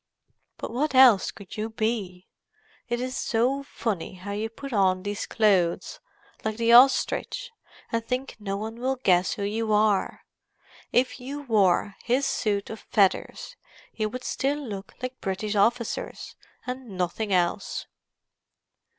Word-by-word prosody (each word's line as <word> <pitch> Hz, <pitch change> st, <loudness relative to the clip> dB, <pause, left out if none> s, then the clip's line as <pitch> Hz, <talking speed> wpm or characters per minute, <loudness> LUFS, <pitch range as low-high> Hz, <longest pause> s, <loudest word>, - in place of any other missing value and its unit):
"But -, -, -6 dB
what 275 Hz, +4 st, -1 dB
else 250 Hz, -7 st, +7 dB
could 200 Hz, 0 st, -10 dB
you 215 Hz, +1 st, -2 dB
be? 215 Hz, -5 st, -3 dB, 0.6 s
It 240 Hz, 0 st, 0 dB
is 255 Hz, +1 st, -3 dB
so 250 Hz, +5 st, +1 dB
funny 215 Hz, -10 st, -4 dB
how 185 Hz, +3 st, -7 dB
you 215 Hz, +2 st, -2 dB
put 275 Hz, +4 st, -8 dB
on 185 Hz, -3 st, +2 dB
these 205 Hz, 0 st, -3 dB
clothes, 195 Hz, -6 st, +1 dB, 0.4 s
like 220 Hz, 0 st, -2 dB
the 235 Hz, 0 st, +3 dB
ostrich, 275 Hz, -, +4 dB, 0.4 s
and 230 Hz, 0 st, 0 dB
think 255 Hz, +3 st, -3 dB
no 200 Hz, -1 st, -3 dB
one 220 Hz, +3 st, -6 dB
will 260 Hz, +2 st, 0 dB
guess 185 Hz, -8 st, +2 dB
who 200 Hz, -, -4 dB
you 215 Hz, +2 st, -1 dB
are. 210 Hz, -2 st, +2 dB, 0.7 s
If 255 Hz, +2 st, +1 dB
you 280 Hz, +3 st, -6 dB
wore 205 Hz, -5 st, +2 dB
his 255 Hz, +4 st, +1 dB
suit 210 Hz, -7 st, -1 dB
of 220 Hz, -, -7 dB
feathers 195 Hz, -3 st, 0 dB, 0.4 s
you 215 Hz, -1 st, -1 dB
would 250 Hz, +3 st, -7 dB
still 275 Hz, +3 st, -1 dB
look 200 Hz, -2 st, -7 dB
like 255 Hz, 0 st, -5 dB
British 200 Hz, +2 st, -2 dB
officers 230 Hz, +3 st, 0 dB, 0.3 s
and 250 Hz, -6 st, -6 dB
nothing 185 Hz, +4 st, -2 dB
else." 180 Hz, +1 st, 0 dB
220 Hz, 140 wpm, -26 LUFS, 200-250 Hz, 0.7 s, else